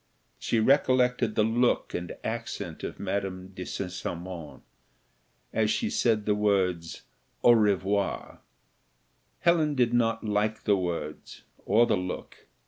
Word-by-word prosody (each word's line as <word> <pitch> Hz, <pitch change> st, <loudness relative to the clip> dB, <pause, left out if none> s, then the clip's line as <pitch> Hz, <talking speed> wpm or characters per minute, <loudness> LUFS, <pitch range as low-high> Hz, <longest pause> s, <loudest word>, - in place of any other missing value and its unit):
She 115 Hz, -, 0 dB
recollected 125 Hz, -2 st, +3 dB
the 110 Hz, -, +3 dB
look 120 Hz, +3 st, +1 dB
and 90 Hz, 0 st, -5 dB
accent -, -, -5 dB
of -, -, -5 dB
Madame 95 Hz, -1 st, -3 dB
de 95 Hz, -1 st, -7 dB
St. 95 Hz, -2 st, -4 dB
Cymon, 85 Hz, -3 st, -6 dB, 0.9 s
as 110 Hz, -1 st, +2 dB
she 225 Hz, -, 0 dB
said 115 Hz, -, +1 dB
the 105 Hz, -, +3 dB
words 95 Hz, -5 st, 0 dB, 0.4 s
"au 120 Hz, -, +8 dB
revoir." 100 Hz, -3 st, +1 dB, 1.0 s
Helen 160 Hz, -4 st, +3 dB
did 120 Hz, -2 st, +2 dB
not 115 Hz, -1 st, +1 dB
like 105 Hz, +1 st, 0 dB
the 105 Hz, -, +3 dB
words, 85 Hz, -5 st, -5 dB, 0.2 s
or 110 Hz, +4 st, +5 dB
the -, -, +1 dB
look. 90 Hz, 0 st, -6 dB
105 Hz, 130 wpm, -28 LUFS, 95-120 Hz, 1.0 s, au